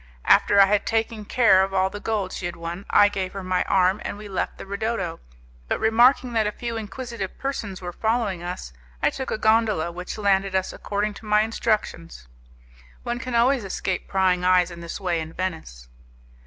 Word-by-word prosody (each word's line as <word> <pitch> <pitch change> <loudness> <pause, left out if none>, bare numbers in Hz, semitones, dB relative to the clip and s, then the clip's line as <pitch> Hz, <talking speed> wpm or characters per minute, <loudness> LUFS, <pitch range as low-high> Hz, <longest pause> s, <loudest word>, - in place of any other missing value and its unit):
After 200 - +5
I 195 - +9
had 205 +1 +1
taken 225 -1 -1
care 205 -5 +5
of 195 0 -1
all 190 0 +2
the 205 - -6
gold 205 -3 -2
she 175 - -3
had 175 - -6
won, 170 +3 -7
I 205 - +6
gave 190 -2 -3
her 195 -1 -6
my 185 0 0
arm, 190 +2 +2
and - - -5
we 210 0 -9
left 190 -2 -3
the - - -8
'ridotto', 200 -4 -3 0.5
but - - -1
remarking 240 +3 +4
that 220 -2 +2
a - - -1
few 235 +1 -5
inquisitive 225 -2 -6
persons 210 -9 -4
were 175 0 -5
following 220 -5 -1
us, 175 - -6 0.3
I - - +4
took 265 - -5
a - - -1
gondola 215 -6 +2
which 180 +4 -7
landed 195 -2 +1
us 190 0 0
according 205 +1 -2
to - - -14
my 210 0 +4
instructions. 215 - -2 0.8
One 240 0 -3
can 255 -1 -4
always 245 +1 +3
escape 190 -1 -3
prying 185 -2 +1
eyes 180 -1 +3
in 170 - -9
this 170 - -6
way 180 -4 -1
in 160 0 -6
Venice. 160 - -5
195 Hz, 195 wpm, -24 LUFS, 185-220 Hz, 0.8 s, I